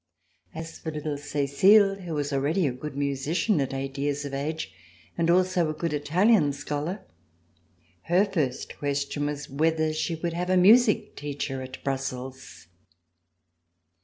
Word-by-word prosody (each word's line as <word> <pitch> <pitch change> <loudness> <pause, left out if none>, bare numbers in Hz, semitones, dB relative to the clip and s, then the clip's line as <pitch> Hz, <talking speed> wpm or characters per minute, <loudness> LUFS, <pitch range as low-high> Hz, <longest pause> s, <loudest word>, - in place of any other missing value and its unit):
As 160 0 -7
for 160 - -5
little 150 -1 -3
Cecile, 170 +9 +4
who 175 -5 -6
was 145 -1 -2
already 150 +7 +1
a 135 - +1
good 140 +3 -7
musician, 145 +6 0
at 135 - -2
eight 135 0 -4
years 145 0 -1
of 140 - -6
age, 155 +4 -3 0.4
and 165 -1 0
also 180 -2 +3
a 155 - -3
good 165 0 -2
Italian 155 +2 +3
scholar, 150 +8 -4 1.0
her 180 +4 +4
first 155 -11 -3
question 145 0 -1
was 150 0 -4
whether 155 +2 +1
she 155 +2 -1
would 170 +1 -3
have 180 +2 -2
a 185 - +4
music 210 +4 +5
teacher 140 -2 -4
at 130 0 -9
Brussels. 130 - -5
150 Hz, 145 wpm, -26 LUFS, 140-175 Hz, 1.0 s, music